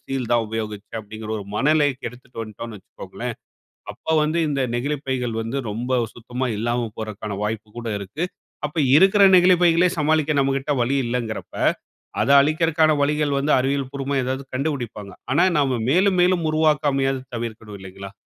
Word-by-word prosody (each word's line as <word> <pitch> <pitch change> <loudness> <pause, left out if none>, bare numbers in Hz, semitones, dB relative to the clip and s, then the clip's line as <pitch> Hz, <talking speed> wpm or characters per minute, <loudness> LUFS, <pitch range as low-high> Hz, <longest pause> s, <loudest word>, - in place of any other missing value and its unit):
Steel 130 -3 -4
தான் 120 -1 +3
உபயோகிச்சேன் 110 0 -5
அப்படின்ற 110 +1 -8
ஒரு 100 - -7
மனநிலைக்கு 145 -2 +2
எடுத்துட்டு 125 -1 -9
வந்துட்டோம்ன்னு 110 0 -8
வைச்சுக்கோங்களேன், 95 - -8 0.6
அப்ப - - -20 0.2
வந்து 160 +3 0
இந்த 140 -1 -1 0.2
நெகிழிப்பைகள் 130 -3 -2
வந்து 115 +5 -3
ரொம்ப 125 +4 -1 0.2
சுத்தமா 125 +2 -4
இல்லாம 120 +1 -1
போரக்கான 105 -2 -5
வாய்ப்பு 110 0 -3
கூட 120 - -5
இருக்கு. 100 - -4 0.4
அப்ப 150 - -12 0.2
இருக்கிற 195 +4 +5
நெகிழிப் 180 0 +6
பைகளே 170 +1 +5
சமாளிக்க 155 0 +2
நம்மகிட்ட 135 +1 +1
வழி 125 +4 +1
இல்லங்குறப்ப, 120 -2 -4 0.7
அத - - 0
அழிக்கற்கான 155 +1 +3
வழிகள் 150 0 +1
வந்து 145 +2 +1
அறிவியல் 135 0 -1
பூர்வமா 140 0 -3
ஏதாவது 130 +2 -3
கண்டுபிடிப்பாங்க. 120 -8 -3 0.2
ஆனா 170 +6 +4
நாம 135 -4 +1
மேலும் 185 +4 +3
மேலும் 180 -2 +2
உருவாக்காமயாது 145 -4 +1 0.2
தவிர்க்கணும் 110 -3 -6
இல்லைங்களா? 95 +1 -9
130 Hz, 145 wpm, -22 LUFS, 115-150 Hz, 0.7 s, நெகிழிப்